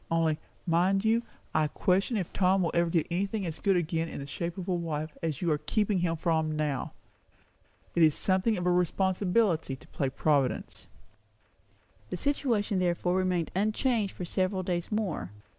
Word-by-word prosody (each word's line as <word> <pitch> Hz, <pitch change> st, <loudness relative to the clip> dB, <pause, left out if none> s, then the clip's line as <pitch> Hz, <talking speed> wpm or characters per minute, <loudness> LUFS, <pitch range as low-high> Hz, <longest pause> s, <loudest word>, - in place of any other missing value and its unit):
Only, 165 Hz, -2 st, +1 dB, 0.3 s
mind 185 Hz, +4 st, +2 dB
you, 225 Hz, +1 st, +3 dB, 0.3 s
I 155 Hz, -1 st, +3 dB
question 195 Hz, -, +1 dB
if 185 Hz, -5 st, -3 dB
Tom 185 Hz, 0 st, +3 dB
will 170 Hz, -, 0 dB
ever 170 Hz, 0 st, +2 dB
get 165 Hz, -2 st, +1 dB
anything 195 Hz, +3 st, -1 dB
as 160 Hz, -2 st, -5 dB
good 195 Hz, -2 st, +2 dB
again 165 Hz, -1 st, -1 dB
in -, -, -7 dB
the 140 Hz, -, -5 dB
shape 170 Hz, +5 st, -4 dB
of 185 Hz, -, -5 dB
a 185 Hz, -, +1 dB
wife, 155 Hz, -3 st, -3 dB
as 160 Hz, -1 st, -2 dB
you 170 Hz, -, +2 dB
are 150 Hz, -, +1 dB
keeping 205 Hz, +5 st, +1 dB
him 170 Hz, -1 st, +1 dB
from 160 Hz, -1 st, 0 dB
now. 150 Hz, -3 st, -2 dB, 1.0 s
It 170 Hz, -, +2 dB
is 155 Hz, -2 st, +6 dB
something 190 Hz, +3 st, +1 dB
of 180 Hz, -, -3 dB
a 180 Hz, -, +3 dB
responsibility 180 Hz, -2 st, +1 dB
to -, -, -17 dB
play 135 Hz, -, -1 dB
Providence." 140 Hz, -1 st, 0 dB, 1.2 s
The -, -, -3 dB
situation 230 Hz, -6 st, 0 dB
therefore 175 Hz, 0 st, +1 dB
remained 185 Hz, -3 st, 0 dB
unchanged 215 Hz, +1 st, +1 dB
for 180 Hz, -, -5 dB
several 185 Hz, +2 st, 0 dB
days 175 Hz, 0 st, -2 dB
more. 195 Hz, -, -1 dB
Mrs. -, -, -20 dB
180 Hz, 175 wpm, -29 LUFS, 160-195 Hz, 1.2 s, is